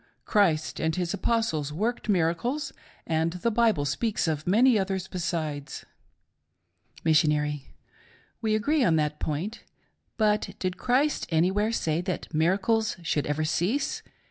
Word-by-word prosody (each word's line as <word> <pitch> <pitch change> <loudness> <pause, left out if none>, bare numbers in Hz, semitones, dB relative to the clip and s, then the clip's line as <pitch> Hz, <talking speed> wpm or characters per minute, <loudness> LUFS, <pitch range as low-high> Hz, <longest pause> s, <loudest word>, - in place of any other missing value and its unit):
Christ 170 -8 +2
and 160 0 0
His 180 -2 -1
Apostles 160 -11 0
worked 220 +8 -2
miracles, 200 - 0 0.3
and 160 +1 0
the 180 +6 -1
Bible 225 -9 +2
speaks 215 - -1
of 155 0 -2
many 225 +4 +5
others 190 -1 -2
besides. 155 -6 -4 1.2
M.: 150 -2 +3 0.8
We 220 -1 +1
agree 285 +7 +2
on 165 -8 +3
that 150 -1 0
point. 165 +9 -3 0.5
But 210 -2 +1
did 185 0 -3
Christ 270 +7 +1
anywhere 190 +7 +2
say 165 -7 0
that 180 -2 -4
miracles 195 +8 +1
should 150 -2 0
ever 150 +2 0
cease 190 - 0
180 Hz, 125 wpm, -27 LUFS, 155-220 Hz, 1.2 s, many